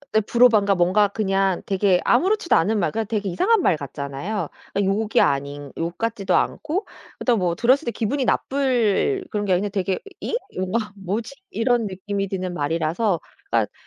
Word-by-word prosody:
어 220 - +5
브로반가 220 -5 +4
뭔가 185 +4 +3
그냥 195 -2 0
되게 195 -2 +2
아무렇지도 370 - +3
않은 210 +6 +2
말 185 - 0
그냥 220 -1 -2
되게 210 -3 -1
이상한 380 - +2
말 165 - +3
같잖아요. 140 - -4 0.3
어 - - +2
욕이 205 +2 +1
아닌 140 0 -1
욕 170 +1 -3
같지도 225 -4 0
않고 325 +7 -1 0.3
그렇다고 240 -4 +1
뭐 175 -2 0
들었을 260 - +3
때 - - +1
기분이 255 +5 -1
나쁠 265 - +1
그런 210 -2 -1
게 185 - +3
아니고 200 +3 +1
되게 190 -2 -1 0.2
'잉?' - - -3 0.2
뭔가 210 +4 -2
'뭐지?' 205 +6 -4 0.2
이런 240 - +1
느낌이 195 +1 -3
드는 185 -1 -3
말이라서 165 +5 0 0.3
그러니까 - - +1
205 Hz, 365 characters per minute, -22 LUFS, 180-230 Hz, 0.3 s, 어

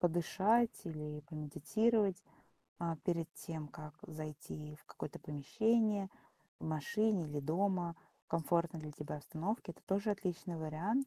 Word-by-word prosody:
подышать 190 +7 +4
или 150 -2 -4
помедитировать, 190 +7 +2 0.6
а, 170 -1 0
перед 170 -2 +1
тем 160 -3 -5
как 150 0 -8
зайти 155 -1 -6
в - - -21
какое-то 150 - -6
помещение, 210 - +2 0.5
в - - -4
машине 180 +5 +2
или 145 -1 -2
дома, 175 +2 +1 0.3
в - - -57
комфортной 170 0 +2
для 150 - -5
тебя 150 +1 -4
обстановке- 175 +6 -2
это - - -21
тоже 200 +2 +2
отличный 180 -3 -1
вариант. 175 - +1
170 Hz, 130 wpm, -37 LUFS, 155-200 Hz, 0.6 s, подышать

